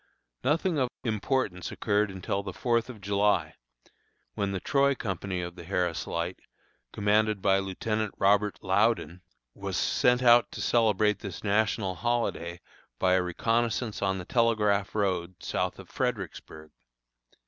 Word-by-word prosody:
Nothing 155 +4 +1
of 130 -2 +1
importance 110 -5 -1
occurred 105 -1 +1
until 95 +1 -3
the 95 -2 -6
Fourth 115 +1 0
of 115 -5 -9
July, 100 +1 +1 0.8
when 100 -1 -1
the 95 - -2
Troy 140 +5 +2
company 95 -4 -3
of 85 0 -6
the 85 - -10
Harris 90 -2 -1
Light, 85 +2 -3 0.5
commanded 105 0 +2
by 95 0 +3
Lieutenant 105 +2 -2
Robert 100 +1 +3
Loudon, 95 -3 +1 0.3
was - - -4
sent 125 +1 +2
out 120 -1 +6
to - - -7
celebrate 105 -3 +2
this 100 -6 -7
national 105 -1 +1
holiday 90 -5 -2 0.4
by 90 +4 +2
a 95 - +4
reconnoissance 115 +5 -1
on 95 -1 +1
the 90 - -6
Telegraph 105 -4 +1
Road, 95 -3 0
south - - -2
of - - -11
Fredericksburg. 95 -10 -4
100 Hz, 135 wpm, -28 LUFS, 95-115 Hz, 0.8 s, out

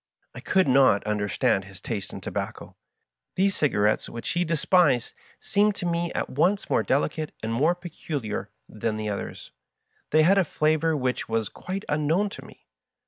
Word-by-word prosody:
I - - -8
could 190 -4 +2
not 130 -6 +5
understand 105 0 0
his 95 -1 -12
taste 105 -5 -5
in - - -8
tobacco. - - -5 0.6
These 195 +1 +2
cigarettes 105 -8 +1
which 115 - -6
he 175 - +1
de 165 -1 0
spised 160 -8 +3 0.3
seemed 205 0 +2
to 180 - -5
me 170 0 -1
at - - -2
once 180 +9 +1
more - - +3
delicate 150 +3 -1
and 110 +1 -2
more 155 +9 +2
peculiar 155 - -5 0.2
than 110 -1 -3
the 105 0 -3
others. 100 - -6 0.6
They 155 +1 +4
had 195 +5 +5
a - - +4
flavor 155 0 +1
whichwas 115 -4 -1
quite 190 +2 -5
unknown 155 +7 +1
to - - -9
me. - - -16
150 Hz, 165 wpm, -26 LUFS, 115-175 Hz, 0.6 s, not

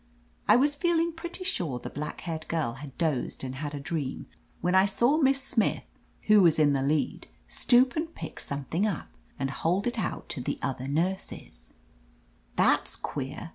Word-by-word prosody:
I - - +7
was 285 +4 +4
feeling 335 +2 +1
pretty 345 +3 -5
sure 170 - -1
the - - -7
black 150 +1 -5
haired 160 -2 -5
girl 155 -8 -1
had 140 -3 -9
dozed 155 -8 -1
and 130 -1 -4
had 145 +2 -4
a - - -4
dream, 140 -2 -3 0.3
when 180 +1 0
I 190 +1 +6
saw 240 +9 +3
Miss 275 -2 +4
Smith, 230 -5 +1 0.4
who 215 -1 +6
was 170 -4 +5
in 150 -2 +4
the 135 - +1
lead, 145 +2 0 0.2
stoop 255 +4 +4
and 325 +1 -2
pick - - -7
something 145 +8 -1
up, 195 -7 -3 0.3
and 135 -1 -2
hold 180 +7 0
it 240 -1 -1
out - - -3
to 130 - -3
the - - -2
other 130 0 -2
nurses, 160 - -3 0.4
" - - -35
That's - - +2
queer 145 +4 -5
165 Hz, 180 wpm, -28 LUFS, -, 0.4 s, I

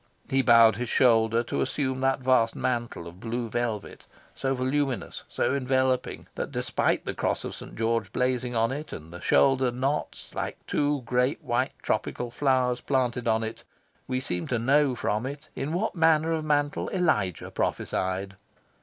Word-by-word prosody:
He 135 0 +4
bowed 115 -4 +6
his 120 -1 -3
shoulders 115 -1 +4
to - - -2
assume 130 -1 -1
that 135 0 +1
vast 125 -3 +3
mantle 120 -8 -2
of 85 +2 -11
blue 115 +2 -3
velvet, 115 -2 -3 0.3
so 135 0 -1
voluminous, 130 0 -1
so - - 0
enveloping, 130 -1 0
that, - - -4
despite - - 0
the - - -2
Cross - - -1
of - - -5
St. - - -9
George 115 +1 0
blazing 125 -1 0
on 115 +2 +2
it, 150 +3 -5
and 80 +2 -9
the 90 - -8
shoulder 135 -1 +4
knots 135 +4 -3
like - - -3
two 145 -2 0
great 125 +2 0
white - - 0
tropical 120 -1 -2
flowers 130 -2 +1
planted 125 -3 0
on 110 0 +2
it, 110 0 -6 0.4
we 130 0 -1
seem 90 -9 -3
to 125 - 0
know 135 +3 +3
from 110 +1 -1
it 145 +2 -8
in 145 - -3
what 185 +7 -1
manner 160 -1 +3
of 160 -1 0
mantle 145 -1 0
Elijah 110 - 0
prophesied. 95 +1 -2
125 Hz, 165 wpm, -27 LUFS, 115-135 Hz, 0.4 s, bowed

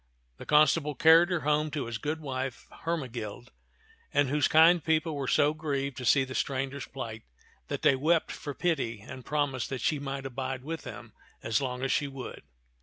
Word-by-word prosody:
The - - -11
constable 150 0 +4
carried 165 +4 +6
her 175 -3 0
home 150 +1 +1
to 150 -1 -3
his 115 -1 -4
good 155 +5 -3
wife 130 -3 -4 0.2
Hermegild; 125 -7 -4 0.6
and 145 -2 +2
those 145 0 +2
kind 165 +1 +6
people 160 0 +1
were 140 -2 -3
so 145 +3 +3
grieved 140 -4 -2
to 125 - -5
see 135 +2 +5
the 130 0 -6
stranger's 135 0 -2
plight 115 -5 -6 0.5
that - - -4
they - - +5
wept 160 +5 +2
for 145 -3 -6
pity 135 - -1
and 130 +4 -9
promised 145 -4 -1
that 135 - -3
she 150 - +1
might 135 -1 -5
abide 130 0 -4
with 160 +3 -5
them 115 -6 -9 0.3
as 115 +5 +1
long 125 -1 -3
as 135 - 0
she 145 - +1
would. 135 -2 -8
140 Hz, 185 wpm, -29 LUFS, 130-155 Hz, 0.6 s, carried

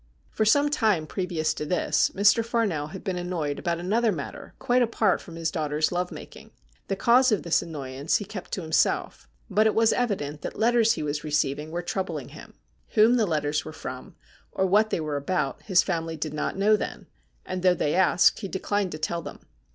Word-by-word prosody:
For 215 - 0
some 285 +6 +4
time 215 - +2
previous 160 -3 -2
to 150 - -5
this, 155 -1 +1
Mr. 205 +4 +4
Farnell 220 -11 -1
had 190 +4 -9
been 185 -2 -2
annoyed 170 -5 -3
about 170 -1 -1
another 220 +6 +1
matter 155 -7 -7
quite 245 +1 +2
apart 220 -4 +1
from 170 - -11
his 165 -1 -2
daughter's 155 -1 0
love 180 0 -2
making. - - -11 0.4
The 195 - -1
cause 245 +5 +4
of 210 - +1
this 170 - +2
annoyance 140 -2 -3
he 205 - -6
kept 190 -2 -8
to 185 - -3
him 160 - -8
self, 155 - +1 0.2
but 215 +3 +3
it 220 - 0
was 225 0 +4
evident 155 -12 -2
that - - -6
letters 230 0 +3
he - - -4
was 150 0 -3
receiving 150 0 -1
were 175 +2 -4
troubling 190 +2 -4
him. - - -13 0.4
Whom 225 +3 +6
the 225 -4 +2
letters 150 -2 0
were 155 - -8
from, - - -8 0.4
or 190 - 0
what 210 +3 +3
they - - -1
were 155 -2 -2
about, 140 -2 -2
his 185 -4 +3
family 165 -3 -3
did 155 0 -4
not 150 - -3
know 210 +2 +4
then, - - -5 0.4
and, 185 - -4
though 180 -1 +4
they 150 - 0
asked, 185 -1 +4
he 200 - -4
declined 195 0 -2
to - - -4
tell 170 +2 -2
them. - - -9
180 Hz, 205 wpm, -26 LUFS, 155-215 Hz, 0.4 s, Whom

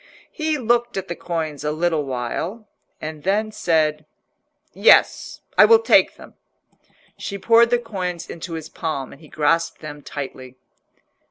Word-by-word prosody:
He 310 -1 -1
looked 240 -2 0
at 190 -1 -4
the 170 - -3
coins 160 -5 -4
a 150 - -1
little 160 -1 0
while, 150 - -4 0.3
and 155 -1 -7
then 210 +5 0
said— 155 -7 0 0.7
"Yes, - - +4 0.2
I - - +10
will 455 - +7
take 455 - +4
them." - - -14 0.9
She 200 - -5
poured 230 +3 +5
the 245 - +3
coins 185 -7 -5
into 170 +1 -7
his 160 -1 -6
palm, 155 -5 -4
and 140 - -15
he 155 - -15
grasped 165 +2 0
them 150 -1 -8
tightly. 130 -3 -8
165 Hz, 150 wpm, -21 LUFS, 150-215 Hz, 0.9 s, I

